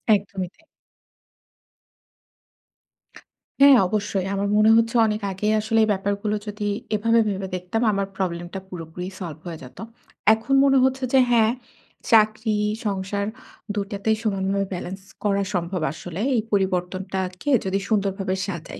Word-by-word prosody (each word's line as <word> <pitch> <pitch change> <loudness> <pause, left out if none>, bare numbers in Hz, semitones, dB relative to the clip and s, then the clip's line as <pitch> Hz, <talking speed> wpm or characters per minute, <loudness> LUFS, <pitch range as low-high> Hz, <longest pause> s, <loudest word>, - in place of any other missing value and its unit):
একদমই 195 -2 -4
তাই। 325 - -27 3.0
হ্যাঁ 280 -2 +9
অবশ্যই। 200 -2 -1
আমার 200 +1 -1
মনে 215 +1 +5
হচ্ছে 230 +1 +1
অনেক 210 0 -2
আগেই 210 +3 0
আসলে 225 +1 +1
এই - - +2
ব্যাপারগুলো 200 +2 -1
যদি 205 0 -3 0.3
এভাবে 230 +2 +3
ভেবে 195 -1 -3
দেখতাম, 180 +5 -3
আমার 200 -1 -1
প্রবলেমটা 175 0 -3
পুরোপুরি 175 +1 -7
সলভ 165 -4 -6
হয়ে 165 -2 -6
যেতো। 125 - -11 0.5
এখন 225 +5 -2
মনে 270 -1 +4
হচ্ছে 265 0 +1
যে 265 - +7
হ্যাঁ, 225 -1 +4 0.6
চাকরি, 215 0 +4 0.3
সংসার 200 0 -2 0.5
২ 205 - -1
টাতেই 210 +2 0
সমানভাবে 195 -1 0
ব্যালেন্স 185 +2 -6 0.2
করা 200 -1 +1
সম্ভব 175 -1 -2
আসলে। 175 +3 -6
এই 225 - +2
পরিবর্তনটাকে 185 +2 -1 0.2
যদি 190 +1 0
সুন্দরভাবে 195 -3 0
সাজাই। 170 -4 -6
200 Hz, 130 wpm, -23 LUFS, 185-215 Hz, 3.0 s, হ্যাঁ